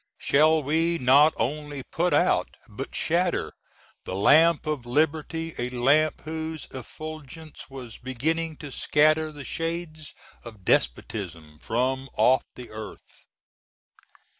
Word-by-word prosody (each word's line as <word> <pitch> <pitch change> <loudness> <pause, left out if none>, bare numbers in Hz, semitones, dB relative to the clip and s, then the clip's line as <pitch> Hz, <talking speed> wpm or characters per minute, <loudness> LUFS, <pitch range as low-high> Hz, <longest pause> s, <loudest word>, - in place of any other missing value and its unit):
Shall 155 +2 +3
we 165 +4 +1
not 140 +3 +6
only 145 +3 -3
put 175 +6 -1
out, 180 - +2
but 120 +5 -7
shatter, 175 +2 0 0.5
the 95 - -5
lamp 155 - +5
of 150 -6 -3
liberty, 160 +4 0
a 120 +1 -1
lamp 140 +5 +2
whose 160 0 -5
effulgence 155 +3 -9
was 125 -4 -9
beginning 155 +6 -2
to 145 - -9
scatter 155 +3 +2
the 145 -2 -10
shades 165 -2 -4 0.3
of 110 -6 -12
despotism 80 - -1
from 130 +6 -1
off 130 +1 +4
the 125 -1 -10
earth? 110 0 -11
150 Hz, 115 wpm, -26 LUFS, 125-160 Hz, 0.5 s, not